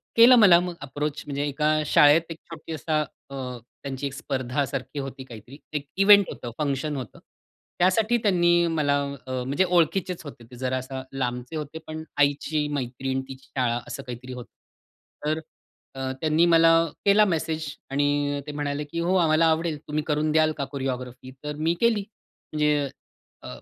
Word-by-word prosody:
केला 235 +2 +9
मला 195 -7 +7
मग 180 0 -3
अप्रोच 145 +2 -4
म्हणजे 140 0 -3
एका 150 +2 0 0.2
शाळेत 150 +2 +6
एक 165 - -6
छोटी 165 0 -8
असा 155 +1 0 0.3
अ, 140 - -8 0.5
त्यांची 135 0 -4
एक 135 - -7
स्पर्धा 135 0 -2
सारखी 135 +2 -5
होती 135 -1 -6
काहीतरी 120 +2 -12 0.2
एक 150 -1 -2
इव्हेंट 200 0 +7
होतं 120 - -7
फंक्शन 145 0 -1
होतं. 130 -6 -7 0.6
त्यासाठी 215 +6 +3
त्यांनी 175 -3 +4
मला 145 -2 +2 0.3
अ, 130 - -5
म्हणजे 140 +8 +1
ओळखीचेच 175 +1 +1
होते 140 -5 -10
ते 125 - -10
जरा 130 +1 -1
असं 130 +1 -5
लांबचे 125 +2 -3
होते 155 +1 -5
पण 155 0 -6
आईची 145 +1 +1
मैत्रीण 130 0 -2
तिची 130 0 -11
शाळा 120 -2 +1
असं 140 - -6
काहीतरी 125 0 -8
होतं. 125 -1 -9 0.8
तर 155 +1 0 0.6
अ, 130 0 -2
त्यांनी 155 +2 +3
मला 165 -1 +6 0.4
केला 205 +1 +6
मेसेज 160 -3 -1 0.3
आणि 145 0 +1
ते - - -4
म्हणाले 145 0 -3
की, 160 +3 -5
"हो, 175 +2 +1
आम्हाला 165 -2 +4
आवडेल 160 -1 +1
तुम्ही 150 0 -1
करून 150 0 +1
द्याल 155 0 +4
का 140 - -2
कोरिओग्राफी 130 -2 -5
तर 150 0 -4
मी 160 +2 +1
केली." 230 -3 +3 0.5
म्हणजे 150 -2 +1 0.5
अ, - - -8
150 Hz, 165 wpm, -25 LUFS, 135-165 Hz, 0.8 s, केला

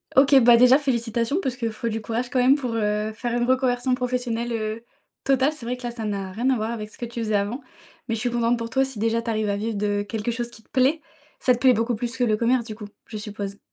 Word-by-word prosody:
OK. 275 +1 +6
Bah, 235 0 +7
déjà 250 +2 +7
félicitations 235 - 0
parce 260 -7 -2
qu'il 230 -3 -2
faut 225 +2 -4
du 220 0 -3
courage 230 +3 -3
quand 255 - 0
même 255 +3 +5
pour, 250 -5 -3
heu, 210 -1 0
faire 240 +1 -4
une - - +1
reconversion 255 0 +1
professionnelle, 245 -2 -2
heu, 220 0 -3 0.4
totale! 270 +2 +3
C'est 240 -6 -9
vrai 250 +1 -2
que, 250 - -14
là, 240 - -3
ça 230 -2 -6
n'a 195 -2 -3
rien 240 +7 0
à 265 - +3
voir 220 0 -2
avec 215 -2 -5
ce - - -15
que 240 - -4
tu 235 0 -7
faisais 215 -1 0
avant. 205 +7 -1 0.5
Mais 225 - -1
je - - -4
suis 245 -1 0
contente 235 0 +1
pour 230 0 -5
toi 265 +1 +3
si 265 -3 -5
déjà 230 +2 +1
tu 230 - -5
arrives 215 -2 0
à 200 - +1
vivre 215 0 -3
de 205 0 0
quelque 220 +2 -3
chose 240 +1 -3
qui 220 -2 -15
te - - -35
plaît. 270 +5 +2 0.4
Ça 250 - +3
te 245 - -3
plaît 260 -2 +6
beaucoup 230 +1 0
plus 240 +3 -4
que 250 - +1
le 215 -3 +2
commerce, 235 +1 +2
du 220 - -6
coup, 210 -1 -9 0.2
je 215 - -7
suppose? 205 -1 -6
235 Hz, 280 wpm, -24 LUFS, 220-250 Hz, 0.5 s, Bah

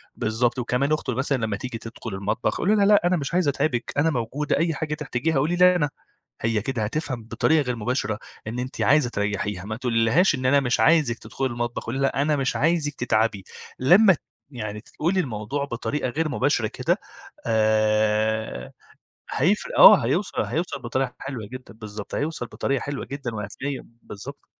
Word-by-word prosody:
بالضبط، 120 +3 0
وكمان 125 +4 0
أخته 155 - -1
مثلًا 135 +1 0
لمّا 100 -2 -2
تيجي 125 -1 -5
تدخل 115 0 -8
المطبخ 100 +5 -1
قولي 205 +4 +2
لها، 200 -2 +4
لأ، 205 -4 +5
أنا 180 0 +2
مش 140 0 -4
عايزة 175 -4 +3
أتعبِك 130 -3 -1
أنا 160 +3 +3
موجودة، 135 +3 -1
أي 165 +1 +1
حاجة 150 +1 -3
تحتاجيها 150 0 -1
قولي 160 +6 +1
لي 180 0 +6
أنا. 150 -5 +1 0.5
هي 115 -1 +1
كده 120 0 -2
هتفهم 130 0 -3
بطريقة 155 +7 +2
غير 125 -3 -2
مباشرة 110 -2 -2 0.3
إن 120 +3 -3
أنتِ 130 +1 -5
عايزة 145 -4 +4
تريحيها، 100 -2 -2
ما 110 - -4
تقولِيلهاش 120 - +2
إن 130 - -5
أنا 140 +2 +5
مش 125 -3 0
عايزك 150 -8 +4
تدخلي 135 - -3
المطبخ، 120 -1 -4
قولي 120 +4 -3
لها 135 0 +1
أنا 150 0 +2
مش 135 -2 -1
عايزك 155 -1 +1
تتعبي. 110 -4 0 0.4
لمّا 190 +9 +6
ت 155 - -7 0.3
يعني 105 -4 -5
تقولي 175 +9 -1
الموضوع 130 - -2
بطريقة 130 +2 -3
غير 155 +4 -1
مباشرة 130 -4 +1
كده - - -1 0.5
آآ، 110 - +1 0.6
هيفرق. - - 0
آه، - - +9
هيوصل - - 0
هيوصل - - -3
بطريقة 130 -2 -2
حلوة 125 -6 -5
جدًا، 130 +2 -10
بالضبط، 105 -2 -8
هيوصل 145 -4 -2
بطريقة 135 +3 -2
حلوة 145 -1 -4
جدًا 135 -4 -5
وهتلقي 120 +7 -4 0.2
بالضبط. 100 - -10
130 Hz, 175 wpm, -24 LUFS, 110-150 Hz, 0.6 s, آه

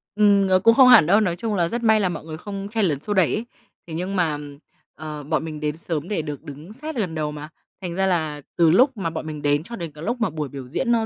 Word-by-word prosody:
Ừm, 205 -2 +4
nó 185 0 +4
cũng 230 +4 +5
không 260 +1 +7
hẳn 245 - +8
đâu. 200 +5 +4
Nói 180 -5 0
chung 215 +2 -3
là 170 -2 +1
rất 235 +5 -4
may 220 -1 +4
là 185 -3 +1
mọi 175 - -5
người 155 -1 -7
không 200 +2 -6
chen 220 -3 +1
lấn 145 -5 0
xô 205 - -2
đẩy 185 -5 +3
ấy. 220 - -2 0.4
Thế 160 - -8
nhưng 185 +4 -3
mà, 160 -5 +1 0.6
ờ, 150 -1 -7
bọn 155 +2 -1
mình 155 -2 -6
đến 150 0 -2
sớm 165 -1 -4
để 200 -5 -1
được 150 -3 -7
đứng 150 +8 -10
sát 305 +5 -7
gần 190 -9 -2
đầu 150 -1 -2
mà, 150 +1 -8 0.3
thành 175 -2 -5
ra 190 +1 +1
là 155 -5 -1
từ 170 -2 +4
lúc 255 - +4
mà 170 -4 -2
bọn 160 -1 -5
mình 150 -2 -6
đến 145 +1 +1
cho 235 +7 -8
đến 170 -7 -6
cái 150 +2 -11
lúc 240 +3 -2
mà 225 - +2
buổi 150 -3 -4
biểu 135 -3 -8
diễn 235 - -1
nó 225 -1 +2
175 Hz, 290 wpm, -23 LUFS, 155-210 Hz, 0.6 s, hẳn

